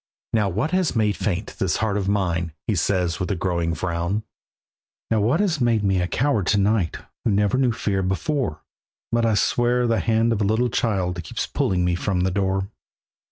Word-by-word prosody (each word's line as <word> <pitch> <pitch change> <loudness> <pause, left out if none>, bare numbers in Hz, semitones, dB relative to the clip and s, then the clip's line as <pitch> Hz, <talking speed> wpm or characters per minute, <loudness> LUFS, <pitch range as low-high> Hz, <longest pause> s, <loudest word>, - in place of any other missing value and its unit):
"Now 105 -3 +2
what 110 - -1
has 185 -6 +1
made 105 -3 +2
faint 90 -5 -3
this - - +1
heart 110 -2 0
of 100 -2 -1
mine?" 85 -5 0
He 110 - 0
says 90 -1 0
with 90 - -2
a 100 - 0
growing 85 -2 -1
frown. 85 +5 -2 0.9
"Now 110 - +3
what 120 - +2
has 175 -9 +1
made 115 -3 +2
me 95 -2 +2
a 90 - 0
coward 125 - 0
to 100 - +3
night, 100 -3 +1 0.3
Who - - +1
never 105 +1 +2
knew 130 -3 +3
fear 100 -4 -1
before? 95 - -1 0.5
But 115 0 +2
I 110 - +2
swear 120 +4 +2
that 115 - +2
the 115 - +1
hand 115 0 +2
of 110 - -2
a - - +3
little 110 +5 +2
child 95 -7 -1
Keeps - - -3
pulling 90 -2 0
me 90 - +1
from 90 +1 -1
the 95 +1 +1
door." 95 +1 -1
100 Hz, 205 wpm, -23 LUFS, 90-115 Hz, 0.9 s, Now